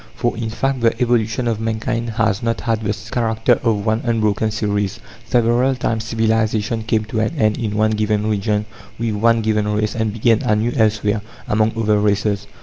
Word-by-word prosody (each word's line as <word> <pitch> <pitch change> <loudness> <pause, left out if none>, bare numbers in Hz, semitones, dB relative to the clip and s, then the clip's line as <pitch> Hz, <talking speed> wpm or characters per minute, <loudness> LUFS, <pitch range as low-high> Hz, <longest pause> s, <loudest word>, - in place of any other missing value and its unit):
For, 120 - -1
in 115 -1 -3
fact, 135 +4 -1
the 115 0 +2
evolution 120 -1 +1
of 115 -2 -1
mankind 115 +1 -2
has 110 -2 +1
not 115 -1 -1
had 115 -2 -1
the 105 -1 -1 0.2
character 115 0 +1
of 110 -3 0
one 110 +1 +1
unbroken 110 -2 +1
series. 105 -2 -2 0.3
Several 120 +2 +2
times 115 -3 -2
civilization 110 0 0
came 110 -1 0
to 110 +1 -3
an 110 +9 -1
end 110 -3 +2
in 105 -3 -2
one 110 0 +3
given 105 -1 0
region, 105 0 0 0.3
with 115 -1 -1
one 115 +2 +2
given 105 -1 +1
race, 105 0 0
and 110 -2 -1
began 115 +1 +2
anew 110 +3 +1
elsewhere, 105 -2 +1 0.3
among 110 +1 +1
other 105 -2 +2
races. 100 0 0
110 Hz, 180 wpm, -19 LUFS, 105-115 Hz, 0.3 s, one